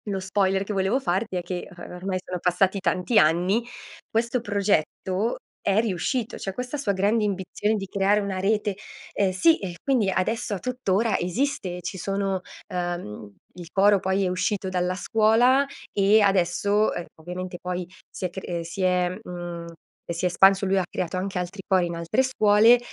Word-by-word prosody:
Lo 195 -2 -1
spoiler 190 0 +1
che 210 - -4
volevo 195 +6 +1
farti 195 -3 -1
è 180 - -1
che, 175 0 -5
uhm, 175 -2 -11
ormai 185 +1 -3
sono 180 -1 -4
passati 185 +3 +2
tanti 190 +3 +2
anni, 180 +8 +3 0.5
questo 235 +2 0
progetto 200 0 0 0.3
è 200 +1 +3
riuscito, 225 +3 -1
cioè 195 - -4
questa 250 +6 -4
sua 250 -8 0
grande 205 +4 +2
ambizione 205 +2 -1
di 195 -2 -3
creare 200 +2 +2
una 200 -2 -3
rete, 205 +1 +1 0.4
ehm, 200 -2 +2
sì, 315 - +4
eh, 180 -3 -5
quindi 250 -8 +2
adesso 205 +3 -1
a - - -5
tuttora 230 -3 0
esiste, 180 -2 -2
ci 180 +2 -5
sono, 195 0 -1 0.3
ehm, 175 - -4 0.2
il 175 -2 -10
coro 200 +1 +4
poi 190 +1 0
è - - +1
uscito 190 +1 -1
dalla 180 0 0
scuola 230 +7 +3 0.2
e 205 +2 +4
adesso, 200 +2 +2
uhm, 175 - -4
ovviamente 180 +2 -6
poi 180 0 -3 0.2
si - - -5
è - - -1
cr 190 - -6
eh, 170 -1 -2
si 170 +4 -6
è, 180 -1 +2
mhmm, 175 -3 -6 0.5
si 170 +2 -2
è - - +5
espanso. 195 +2 +5
Lui 195 0 +2
ha 190 - +2
creato 175 0 -3
anche 185 0 -2
altri 180 +3 -5
cori 185 -2 +3
in 170 0 -4
altre 170 +9 +1
scuole, 225 -2 +5
195 Hz, 180 wpm, -25 LUFS, 180-210 Hz, 0.5 s, è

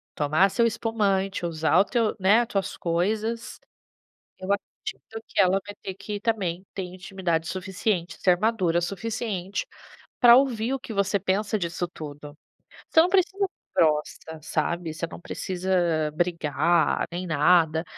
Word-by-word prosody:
tomar 155 +6 +3
seu 235 +4 +2
espumante, 205 -5 0
usar 160 0 +1
o 195 - +5
teu, 230 -2 0
né, 210 +6 +4
tuas 195 -5 -2
coisas, 215 +7 -2 0.8
eu 185 0 -7
acredito 220 +2 -6
que - - 0
ela 190 0 +4
vai 205 - -7
ter 190 - -5
que 205 +2 -6
também 195 -5 -1
ter 195 - -3
intimidade 180 -2 -3
suficiente, 185 -1 -2
e - - -25
ser 180 -2 +4
madura 190 -5 +1
o - - 0
suficiente 200 0 -3 0.5
pra 240 -1 +9
ouvir 250 -2 +2
o 270 - -2
que 250 -3 -8
você 200 0 +1
pensa 205 +3 0
disso 175 -1 -3
tudo. 150 -3 -9 0.6
Você 320 - +6
não 345 - +2
precisa 385 +1 +2
ser - - -22 0.3
grossa, 155 0 -1
sabe, 165 +1 -2
você 170 +1 -3
não 165 - -10
precisa 175 -4 -1
brigar 165 -1 +1
nem 180 +1 -4
nada, 160 0 +3
185 Hz, 150 wpm, -25 LUFS, 170-215 Hz, 0.8 s, pra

